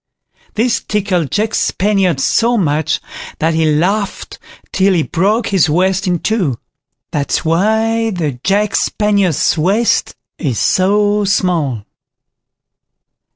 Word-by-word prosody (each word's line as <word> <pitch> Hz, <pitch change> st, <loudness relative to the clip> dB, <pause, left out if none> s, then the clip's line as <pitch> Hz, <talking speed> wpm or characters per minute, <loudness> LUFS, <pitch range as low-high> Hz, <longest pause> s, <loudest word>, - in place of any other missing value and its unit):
This 230 Hz, +1 st, +1 dB
tickled 190 Hz, -7 st, -1 dB
Jack 215 Hz, +2 st, -1 dB
Spaniard 190 Hz, -6 st, +1 dB
so 235 Hz, -, +2 dB
much, 155 Hz, -5 st, 0 dB, 0.4 s
that 165 Hz, +1 st, 0 dB
he 160 Hz, -1 st, +1 dB
laughed 195 Hz, +7 st, -2 dB, 0.3 s
till 190 Hz, 0 st, +2 dB
he 165 Hz, -, +1 dB
broke 205 Hz, +9 st, 0 dB
his 190 Hz, -5 st, +2 dB
waist 190 Hz, +4 st, +1 dB
in 180 Hz, -1 st, +1 dB
two. 175 Hz, -, -1 dB, 0.5 s
That's 145 Hz, +2 st, -2 dB
why 220 Hz, +7 st, +1 dB
the 155 Hz, -, -3 dB
Jack 200 Hz, +1 st, +1 dB
Spaniard's 200 Hz, -7 st, +1 dB
waist 200 Hz, +8 st, +1 dB, 0.2 s
is 130 Hz, -8 st, -2 dB
so 205 Hz, +2 st, +2 dB
small. 165 Hz, -, 0 dB
190 Hz, 110 wpm, -15 LUFS, 160-210 Hz, 0.5 s, so